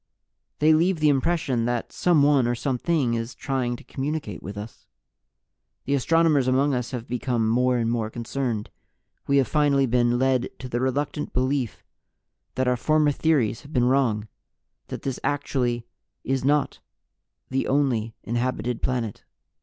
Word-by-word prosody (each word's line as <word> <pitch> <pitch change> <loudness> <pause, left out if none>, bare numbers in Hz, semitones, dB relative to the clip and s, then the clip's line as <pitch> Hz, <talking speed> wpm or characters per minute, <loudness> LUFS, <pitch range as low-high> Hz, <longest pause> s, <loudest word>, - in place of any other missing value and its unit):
They 155 +1 +5
leave 170 +2 +2
the 155 -1 +4
impression 135 -4 +1
that 120 -1 -2
someone, 145 -7 +3
or 120 - 0
something, 135 +1 0
is 115 0 -3
trying 130 -3 -2
to - - -12
communicate 135 - -4
with 100 +3 -7
us. 105 +2 -9 1.0
"The 140 - 0
astronomers 150 -1 +3
among 135 +2 +2
Us 125 -2 -2
have 125 -3 -6
become 120 -2 -1
more 125 +2 +2
and 115 -1 0
more 115 -2 -1
concerned. 120 -1 -3 0.6
We 140 - +3
have 135 - +3
finally 145 -3 +3
been 120 -1 +2
led 130 -1 +1
to 130 - -7
the 120 -1 -2
reluctant 145 +3 -2
belief 130 -2 -1 0.7
that 130 0 0
Our 125 0 +2
former 155 +3 +3
theories 140 -7 +1
have 150 +1 -14
been 125 -2 +3
wrong 125 -5 +1 0.6
that - - -7
this 135 -2 -3
actually 125 -4 -1 0.4
is 135 -1 -1
not 145 +1 +1 0.7
the 135 +1 0
only 125 -6 +1
inhabited 120 0 -2
planet. 120 -5 -2
130 Hz, 150 wpm, -25 LUFS, 120-140 Hz, 1.0 s, They